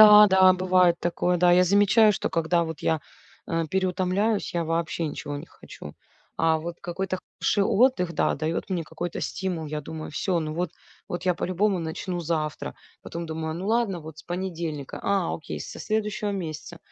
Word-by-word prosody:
Да, 210 Hz, -1 st, +10 dB
да 190 Hz, -1 st, +6 dB
бывает 185 Hz, -2 st, +3 dB
такое, 175 Hz, +1 st, +1 dB
да, 175 Hz, 0 st, +5 dB
я 180 Hz, +1 st, +6 dB
замечаю, 205 Hz, +3 st, +5 dB
что -, -, -2 dB
когда 165 Hz, +1 st, +1 dB
вот 160 Hz, -2 st, -6 dB
я, 160 Hz, -2 st, +1 dB, 0.5 s
э, 165 Hz, 0 st, 0 dB
переутомляюсь, 190 Hz, +3 st, 0 dB
я 170 Hz, -1 st, 0 dB
вообще 165 Hz, 0 st, -1 dB
ничего 145 Hz, 0 st, -5 dB
не 145 Hz, -, -8 dB
хочу, 75 Hz, -, -12 dB, 0.4 s
а 160 Hz, 0 st, +3 dB
вот 170 Hz, +2 st, -6 dB
какой-то 185 Hz, +1 st, -3 dB, 0.2 s
хороший 200 Hz, -, +2 dB
отдых, 200 Hz, -7 st, +3 dB
да, 150 Hz, -, +1 dB
дает 160 Hz, +6 st, -2 dB
мне 175 Hz, -4 st, -1 dB
какой-то 165 Hz, +3 st, -5 dB
стимул. 180 Hz, -5 st, -3 dB
Я 150 Hz, 0 st, -3 dB
думаю, 155 Hz, +2 st, -7 dB
всё, 175 Hz, +4 st, 0 dB
ну, 155 Hz, -1 st, -3 dB
вот 175 Hz, -1 st, -1 dB, 0.4 s
вот 175 Hz, +1 st, -4 dB
я 180 Hz, -1 st, +3 dB
по -, -, -3 dB
любому 185 Hz, +1 st, +1 dB
начну 175 Hz, +2 st, -3 dB
завтра, 155 Hz, -2 st, -2 dB, 0.3 s
потом 170 Hz, 0 st, -6 dB
думаю, 160 Hz, 0 st, -3 dB
ну, 185 Hz, +4 st, -5 dB
ладно, 220 Hz, -5 st, +1 dB
вот 155 Hz, -1 st, -10 dB
с -, -, -10 dB
понедельника, 170 Hz, -5 st, -4 dB
а-а, 195 Hz, -4 st, +1 dB
окей 155 Hz, -, -7 dB
со -, -, -7 dB
следующего 210 Hz, -1 st, -1 dB
месяца. 170 Hz, -2 st, -5 dB
175 Hz, 180 wpm, -26 LUFS, 160-190 Hz, 0.5 s, Да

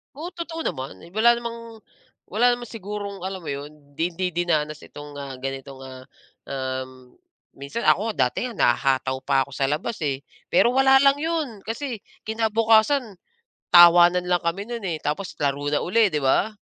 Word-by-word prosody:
Oo, 320 Hz, +5 st, -6 dB
totoo 335 Hz, -2 st, -6 dB
naman. 130 Hz, -8 st, -4 dB
Wala 235 Hz, +3 st, +5 dB
namang 230 Hz, -1 st, -8 dB, 0.5 s
wala 240 Hz, +5 st, +4 dB
namang 240 Hz, -1 st, -7 dB
sigurong 205 Hz, -2 st, -6 dB
alam 190 Hz, -1 st, -5 dB
mo -, -, -6 dB
'yon, 140 Hz, +1 st, -6 dB, 0.2 s
'di 160 Hz, -, -1 dB
hindi 185 Hz, +1 st, -1 dB
dinanas 155 Hz, -3 st, 0 dB
itong, 145 Hz, 0 st, -11 dB
ah, 140 Hz, -1 st, -6 dB
ganitong, 135 Hz, 0 st, -6 dB
ah, 130 Hz, -1 st, -10 dB, 0.4 s
um, 130 Hz, -1 st, -5 dB, 0.4 s
minsan 140 Hz, -, -5 dB
ako 220 Hz, +3 st, +3 dB
nga 130 Hz, -11 st, +2 dB
dati 250 Hz, -, -3 dB
nga 235 Hz, -, -10 dB
nahahataw 130 Hz, +1 st, +2 dB
pa 135 Hz, -1 st, +3 dB
ako 140 Hz, -, -18 dB
sa 135 Hz, -, +1 dB
labas, 160 Hz, +10 st, -3 dB
eh, 140 Hz, -2 st, -2 dB, 0.3 s
pero 235 Hz, +7 st, +4 dB
wala 270 Hz, 0 st, +6 dB
lang 275 Hz, 0 st, +5 dB
'yon 325 Hz, -1 st, -1 dB, 0.2 s
kasi 235 Hz, 0 st, -4 dB, 0.3 s
kinabukasan, 225 Hz, +1 st, +2 dB, 0.6 s
tawanan 175 Hz, +1 st, +7 dB
lang 175 Hz, -1 st, +2 dB
kami 190 Hz, +5 st, -2 dB
no'n, 235 Hz, -2 st, -5 dB
eh, 170 Hz, -4 st, -2 dB
tapos 150 Hz, +6 st, -3 dB
laro 140 Hz, 0 st, 0 dB
na 145 Hz, -, +2 dB
uli, 215 Hz, +3 st, +3 dB
'di 150 Hz, -, 0 dB
ba. 195 Hz, +11 st, +2 dB
180 Hz, 170 wpm, -24 LUFS, 140-230 Hz, 0.6 s, tawanan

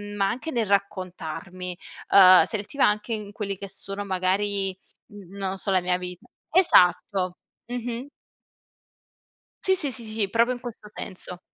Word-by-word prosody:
ma 195 Hz, -1 st, +2 dB
anche 255 Hz, +7 st, -4 dB
nel 235 Hz, -3 st, 0 dB
raccontarmi. 185 Hz, -2 st, -3 dB, 0.3 s
Uhm, 185 Hz, -2 st, +9 dB
selettiva 220 Hz, +6 st, 0 dB
anche 210 Hz, +3 st, -1 dB
in 210 Hz, -2 st, -5 dB
quelli 200 Hz, -3 st, -4 dB
che 200 Hz, -, -7 dB
sono 195 Hz, +1 st, -4 dB
magari 195 Hz, +1 st, 0 dB, 0.4 s
n 205 Hz, -3 st, -12 dB
non 195 Hz, -1 st, -2 dB
lo 195 Hz, -, -5 dB
so, 195 Hz, -, -2 dB
la 185 Hz, -1 st, +3 dB
mia 180 Hz, 0 st, 0 dB
vita 180 Hz, +4 st, -8 dB, 0.2 s
esatto, 185 Hz, -, +4 dB, 0.3 s
mh-mh. 245 Hz, +1 st, -4 dB, 1.6 s
Sì, 380 Hz, 0 st, +3 dB
sì, 300 Hz, -7 st, +1 dB
sì, 235 Hz, -1 st, -5 dB
sì, 215 Hz, -2 st, -2 dB
proprio 235 Hz, +3 st, +3 dB
in 245 Hz, -, -7 dB
questo 235 Hz, -3 st, -9 dB
senso. 180 Hz, -3 st, -8 dB
200 Hz, 150 wpm, -25 LUFS, 185-230 Hz, 1.6 s, Uhm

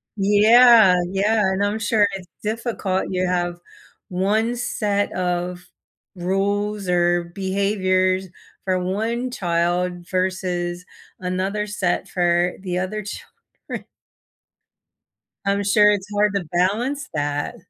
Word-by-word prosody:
Yeah, 215 Hz, 0 st, +6 dB, 0.2 s
yeah, 210 Hz, +3 st, +2 dB
and 190 Hz, +1 st, 0 dB
I'm 205 Hz, +2 st, -1 dB
sure 210 Hz, -1 st, +3 dB
it's 185 Hz, -2 st, -7 dB, 0.2 s
difficult. 215 Hz, -3 st, -2 dB
You 185 Hz, -1 st, 0 dB
have 175 Hz, -1 st, -1 dB, 0.5 s
1 210 Hz, +6 st, 0 dB
set 205 Hz, -4 st, -1 dB
of 180 Hz, 0 st, -2 dB, 0.5 s
rules 200 Hz, +2 st, -1 dB
or 175 Hz, 0 st, +2 dB
behaviors 190 Hz, -1 st, +1 dB, 0.4 s
for 185 Hz, -1 st, +1 dB
1 220 Hz, +7 st, -2 dB
child 175 Hz, -2 st, -1 dB
versus 180 Hz, -1 st, -2 dB, 0.3 s
another 190 Hz, +3 st, -2 dB
set 190 Hz, -4 st, -1 dB
for 175 Hz, 0 st, +1 dB
the 180 Hz, -2 st, -3 dB
other 210 Hz, +3 st, -3 dB
children. 205 Hz, -, -10 dB, 1.6 s
I'm 200 Hz, 0 st, +1 dB
sure 210 Hz, +1 st, +5 dB
it's 200 Hz, -1 st, -2 dB
hard 205 Hz, 0 st, +2 dB
to 195 Hz, -3 st, -1 dB
balance 225 Hz, -, 0 dB
that. 145 Hz, -1 st, -2 dB
190 Hz, 110 wpm, -22 LUFS, 180-210 Hz, 1.6 s, Yeah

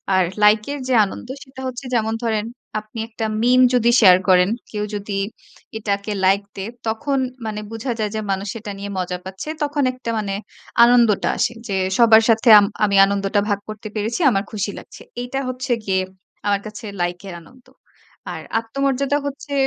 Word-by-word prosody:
আর 185 Hz, -, +4 dB, 0.2 s
লাইকের 215 Hz, +7 st, +3 dB
যে 260 Hz, -, +1 dB
আনন্দ, 195 Hz, -, -8 dB, 0.2 s
সেইটা 265 Hz, 0 st, -12 dB
হচ্ছে 255 Hz, +1 st, -6 dB
যেমন 220 Hz, -1 st, +1 dB
ধরেন, 220 Hz, -2 st, 0 dB, 0.3 s
আপনি 215 Hz, +1 st, -10 dB
একটা 225 Hz, 0 st, -4 dB, 0.2 s
meme 250 Hz, +2 st, +5 dB
যদি 240 Hz, -1 st, +4 dB
শেয়ার 185 Hz, -4 st, +8 dB
করেন, 180 Hz, +1 st, +5 dB, 0.2 s
কেউ 210 Hz, -1 st, -3 dB
যদি 200 Hz, -1 st, -3 dB, 0.6 s
এটাকে 205 Hz, -1 st, -2 dB
লাইক 195 Hz, +2 st, +4 dB
দেয়, 195 Hz, +3 st, -5 dB, 0.2 s
তখন 270 Hz, +6 st, -1 dB, 0.3 s
মানে 215 Hz, -1 st, -3 dB
বোঝা 225 Hz, +3 st, -4 dB
যায় 210 Hz, -1 st, -1 dB
যে, -, -, -1 dB
মানুষ 195 Hz, +1 st, -2 dB
সেটা 215 Hz, -2 st, -6 dB
নিয়ে 200 Hz, 0 st, -5 dB
মজা 180 Hz, -1 st, -2 dB
পাচ্ছে 190 Hz, +10 st, -7 dB
তখন 290 Hz, 0 st, 0 dB
একটা 255 Hz, -2 st, -7 dB
মানে 200 Hz, -2 st, -3 dB, 0.5 s
আনন্দটা 235 Hz, -4 st, +4 dB
আসে। -, -, +1 dB
যে 200 Hz, -, -2 dB, 0.2 s
সবার 225 Hz, -2 st, +7 dB
সাথে 225 Hz, +1 st, +4 dB
আম 205 Hz, -, +3 dB, 0.2 s
আমি 200 Hz, -1 st, +2 dB
আনন্দটা 200 Hz, +1 st, 0 dB
ভাগ 205 Hz, -, +1 dB
করতে 215 Hz, 0 st, -7 dB
পেরেছি। 215 Hz, +6 st, -2 dB
আমার 195 Hz, -1 st, 0 dB
খুশি 210 Hz, -2 st, -2 dB
লাগছে। -, -, -14 dB, 0.2 s
এইটা 245 Hz, +2 st, -3 dB
হচ্ছে 255 Hz, +1 st, -4 dB
গিয়ে 190 Hz, -1 st, +1 dB, 0.5 s
আমার 200 Hz, -1 st, +2 dB
কাছে 215 Hz, +1 st, -8 dB, 0.2 s
লাইকের 175 Hz, +2 st, -3 dB
আনন্দ। 250 Hz, +8 st, -20 dB, 0.7 s
আর -, -, -6 dB, 0.2 s
আত্মমর্যাদা 275 Hz, +4 st, 0 dB
হচ্ছে 285 Hz, +1 st, -7 dB
215 Hz, 170 wpm, -21 LUFS, 200-245 Hz, 0.7 s, শেয়ার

